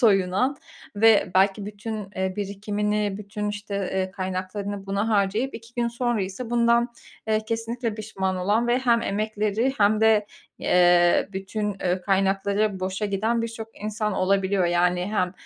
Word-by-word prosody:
soyunan 205 +4 +3 0.4
ve 220 -2 +5
belki 195 +2 +3
bütün, 210 -1 -6
eee, 190 0 -1
birikimini, 205 0 -1
bütün, 210 0 -4
işte, 205 0 -5 0.2
eee, 190 0 -1
kaynaklarını 190 +2 -4
buna 200 +3 -1
harcayıp 210 +5 +1
2 230 +1 -11
gün 240 -1 0
sonra 240 -1 -1
ise 195 +6 -6
bundan, 235 0 +3 0.4
eee, 215 0 +2
kesinlikle 230 0 -2
pişman 195 -3 -3
olan 205 +6 +1
ve 245 +1 +3
hem 235 -3 +2
emekleri 215 +3 0
hem 210 +1 +4
de, 220 -2 +4 0.3
eee, 175 +1 +4
bütün, 195 +1 -3
eee, 180 0 0
kaynakları 195 +1 +1
boşa 190 +3 -2
giden 220 +4 0
birçok 225 -1 -5
insan 215 0 -2
olabiliyor. 190 0 +1
Yani, 180 +1 +2
hem, 180 -4 0
205 Hz, 145 wpm, -24 LUFS, 190-220 Hz, 0.4 s, ve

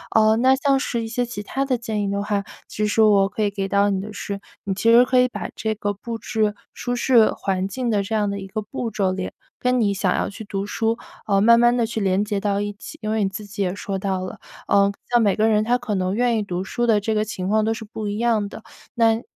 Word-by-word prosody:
呃， 220 0 +5
那 260 +3 +5
像 275 0 +2
是 240 -3 -2
一 - - -4
些 245 +2 -1
其 235 -3 -6
他 270 +6 -2
的 265 -2 +1
建 220 -3 -2
议 200 - -1
的 200 0 -1
话， 205 -1 -1 0.2
其 210 - -2
实 210 +1 +2
我 205 -2 +5
可 205 - -4
以 210 - +2
给 195 -1 -3
到 200 +1 +3
你 195 -1 0
的 210 +2 -7
是， 200 -1 -5 0.3
你 195 -1 -1
其 225 +4 +3
实 235 +1 +8
可 255 0 +3
以 250 - +5
把 250 - -6
这 220 -1 -1
个 205 -1 -2
布 230 +3 -6
置 215 -1 0 0.2
舒 245 0 -2
适 240 -2 +4
环 190 -1 -2
境 240 +5 -3
的 205 -3 +1
这 200 - -5
样 210 -2 +1
的 200 0 -3
一 195 - -7
个 215 +3 -4
步 225 +2 -5
骤， 195 -3 0
连 185 0 -4 0.3
跟 250 0 +1
你 205 -3 +2
想 185 -1 +1
要 - - -1
去 210 +2 -9
读 200 -1 -4
书， 225 +2 -1 0.3
呃 200 -2 +2
慢 235 +2 +6
慢 240 0 +5
地 235 - +2 0.2
连 195 0 +2
接 205 -1 -1
到 200 0 0
一 205 0 -3
起， 205 - -11
因 215 - -3
为 220 -1 +1
你 195 - +1
自 195 +2 -7
己 205 +1 -6
也 180 -2 0
说 200 0 -4
到 190 -1 -2
了， 185 - -7 0.3
呃， 200 0 +4 0.2
像 240 -1 +4
每 205 -3 +3
个 220 +1 +2
人 215 -1 +3
他 240 +3 +2
可 245 -4 -3
能 185 0 0
愿 240 0 +2
意 215 - 0
读 180 -2 -3
书 240 +5 -2
的 220 -3 +4
这 220 +2 -1
个 215 - +2
情 190 -4 -4
况 215 +2 +2
都 220 +1 +1
是 220 0 -7
不 215 0 -6
一 205 0 -3
样 220 -3 +1
的。 220 - -10 0.3
那， 225 -1 +3
215 Hz, 295 characters per minute, -22 LUFS, 200-230 Hz, 0.3 s, 实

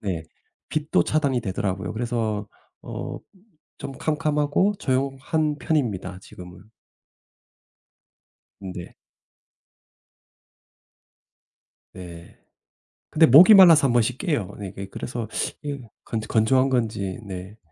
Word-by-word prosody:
네. 90 -6 -4 0.4
빛도 150 - 0
차단이 140 -5 0
되더라고요. 95 -1 -3
그래서 110 -3 -2 0.4
어 - - -6 0.6
좀 135 - -6
캄캄하고 150 +6 0
조용한 135 +3 -1
편입니다 115 - -2
지금은. 90 +1 -13 2.0
네. 90 -3 -8 3.0
네. 85 -2 -11 0.7
근데 160 0 +5
목이 170 - +9
말라서 170 -7 +8
1 120 - 0
번씩 120 +1 +1
깨요. 145 - -2
이게 95 0 -7
그래서 120 +1 -5 0.3
이게 145 -2 -5 0.2
건조 110 -1 -4
건조한 130 +4 +2
건지. 110 -7 -2
네. 95 +2 -8
120 Hz, 195 characters per minute, -23 LUFS, 100-145 Hz, 3.0 s, 목이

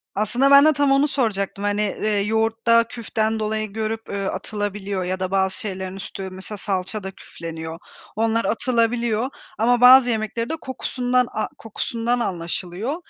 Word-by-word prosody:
Aslında 240 +7 +2
ben 280 +1 +9
de 310 - +6
tam 285 -1 +2
onu 275 +2 +4
soracaktım 205 -8 -1
hani, 205 0 0
eee, 210 0 0
yoğurtta 225 +2 +3
küften 220 -1 -2
dolayı 215 -1 -2
görüp 220 +1 -3
atılabiliyor 200 0 -3
ya 185 +1 -2
da 185 0 -2
bazı 190 -1 +1
şeylerin 190 -2 -5
üstü 195 0 -6
mesela 190 +3 -7
salça 195 +2 -3
da 190 - -5
küfleniyor. 165 -3 -8 0.4
Onlar 225 +1 +1
atılabiliyor 235 -1 +1 0.3
ama 240 +2 +3
bazı 250 0 +8
yemekleri 225 +1 -2
de - - -1
kokusundan 250 -1 0
a 215 - -2
kokusundan 230 +2 -2
anlaşılıyor. 180 - -3
215 Hz, 145 wpm, -22 LUFS, 195-235 Hz, 0.4 s, ben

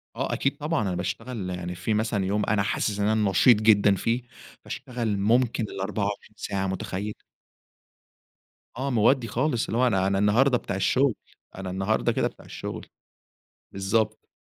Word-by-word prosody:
آه، - - -2
أكيد 135 - 0
طبعًا، 155 -1 -1
أنا 95 -4 -1
باشتغل 100 +2 -4
يعني 90 0 -4
في 110 +5 -1
مثلًا 105 -2 0
يوم 105 +2 0
أنا 100 -1 +1
حاسس 105 0 -1
إن 100 - +2
أنا 110 -2 +2
نشيط 105 +6 +6
جدًا 100 -2 +5
فيه، 115 +6 0 0.4
باشتغل 115 -5 -3
ممكن 115 +3 +2
ال24 100 +1 -3
ساعة، 95 -1 -2
متخيّل؟ 95 +2 -3 1.6
آه، 135 +2 -2
مودّي 120 +2 +3
خالص، 125 0 0
اللي 115 - -2
هو 125 +1 +4
أنا 95 -4 +2
أنا 100 0 +1
النهارده 120 +6 +4
بتاع 100 - -5
الشغل، 125 +5 +2 0.4
أنا 95 -1 -5
النهارده 95 +4 0
كده - - +1
بتاع - - -13
الشغل، - - -6 0.9
بالضبط. 110 +3 -1
105 Hz, 155 wpm, -26 LUFS, 95-120 Hz, 1.6 s, نشيط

